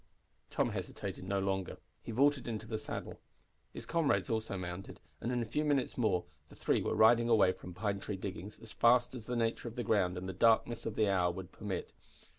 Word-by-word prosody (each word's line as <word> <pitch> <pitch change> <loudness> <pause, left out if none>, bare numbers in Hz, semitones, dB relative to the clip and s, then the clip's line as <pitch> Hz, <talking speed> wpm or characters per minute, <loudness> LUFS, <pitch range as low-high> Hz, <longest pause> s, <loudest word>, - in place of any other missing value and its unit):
Tom - - 0
hesitated - - -5
no 100 +1 0
longer. 95 -1 -1 0.2
He - - -7
vaulted 140 +2 +3
into 110 -2 -4
the 110 -1 -3
saddle. - - -6 0.5
His - - -8
comrades 160 -5 +1
also 110 -3 -1
mounted, 90 +1 -6 0.2
and 120 - -1
in 120 -1 0
a - - -4
few 120 +7 -1
minutes 145 -4 +1
more 100 -8 +1 0.2
the - - -14
three - - +1
were - - -1
riding 115 +2 +5
away 105 -5 +5
from 90 -1 -10
Pine 100 0 -1
Tree 100 0 -4
Diggings 95 +1 -6
as 110 - -7
fast 120 +1 +4
as 115 -4 -8
the 125 - -2
nature 115 0 0
of 115 - -7
the 120 - -2
ground 90 -6 +2
and 90 +1 -5
the 95 - -4
darkness 115 +3 +3
of 110 - -4
the 110 - +3
hour 90 -3 +2
would 90 +1 -8
permit. 95 -4 -4
110 Hz, 215 wpm, -33 LUFS, 95-120 Hz, 0.5 s, riding